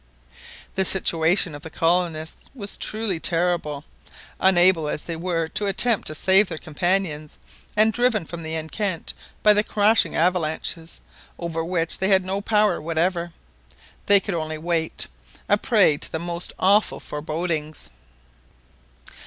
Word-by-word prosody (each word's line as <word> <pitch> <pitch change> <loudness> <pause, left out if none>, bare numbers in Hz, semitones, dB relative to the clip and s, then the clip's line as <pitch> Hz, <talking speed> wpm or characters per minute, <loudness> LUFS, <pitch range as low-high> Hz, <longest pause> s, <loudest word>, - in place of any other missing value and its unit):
The 190 - 0
situation 175 -2 +3
of 145 - -9
the 160 - -9
colonists 165 -1 -1
was 205 -5 -3
truly 215 -5 0
terrible, 165 -4 0 0.6
unable 180 -4 +4
as 150 - -3
they 170 - -5
were 165 -1 -2
to 205 - -2
attempt 220 +3 +3
to 155 - -1
save 190 +5 +4
their - - -5
companions, 155 -1 -2 0.4
and 220 +1 +4
driven 240 -6 +1
from 170 +1 -8
the 160 0 -5
enceinte 165 +3 -3 0.3
by 210 - +7
the 210 0 +2
crashing 215 +1 +2
avalanches, 165 -1 -1 0.4
over 165 -1 -4
which 165 -1 0
they 190 - 0
had 190 -2 +3
no 195 +2 -3
power 210 -3 +1
whatever. 170 +2 -1 0.8
They 200 0 +7
could 195 0 -5
only 155 -2 -3
wait, 165 0 -1 0.4
a 205 - +4
prey 205 - +3
to - - -1
the - - -2
most 170 +1 -4
awful 200 +3 +2
forebodings. 155 - -4
175 Hz, 140 wpm, -22 LUFS, 160-195 Hz, 0.8 s, by